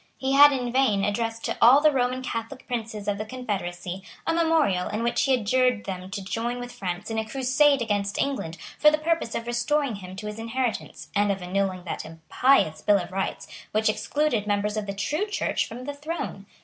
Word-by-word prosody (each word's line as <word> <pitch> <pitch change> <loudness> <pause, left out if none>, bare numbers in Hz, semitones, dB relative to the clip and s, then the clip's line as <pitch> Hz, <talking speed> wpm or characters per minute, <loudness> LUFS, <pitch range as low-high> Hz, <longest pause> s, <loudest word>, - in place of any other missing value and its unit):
He 265 0 -1
had 290 +1 +8
in 250 -3 -2
vain 235 -6 +2
addressed 225 +2 -2
to - - -1
all 255 +4 +8
the 305 +1 +5
Roman 255 -1 0
Catholic 230 +2 -5
princes 220 -4 -4
of 205 0 -1
the - - -1
Confederacy 195 -6 -4 0.2
a 330 - +1
memorial 320 - +2
in 215 +2 -2
which 235 0 +1
he 270 -1 +3
adjured 250 0 +1
them 185 -1 -6
to 195 0 -5
join 235 +5 -2
with 245 0 -6
France 195 +2 -5
in 220 - 0
a 220 - -2
crusade 270 +1 +3
against 205 -2 -1
England 170 -13 -2 0.2
for 300 - +7
the 305 - +1
purpose 325 -6 -1
of 230 - -3
restoring 240 +1 0
him 185 -1 -9
to 210 - -7
his 210 +1 -5
inheritance, 235 +1 -3
and 205 0 +3
of 195 -2 -3
annulling 185 0 -1
that 175 - -4
impious 160 - +1
Bill 205 -1 +4
of 180 -1 -5
Rights 195 +1 -3 0.3
which 215 0 +2
excluded 240 -2 0
members 205 0 0
of 215 -1 -3
the 200 - -4
true 295 - -1
Church 410 - -1
from 240 +3 -8
the 285 +2 -4
throne. 290 - -5
225 Hz, 205 wpm, -25 LUFS, 200-265 Hz, 0.3 s, had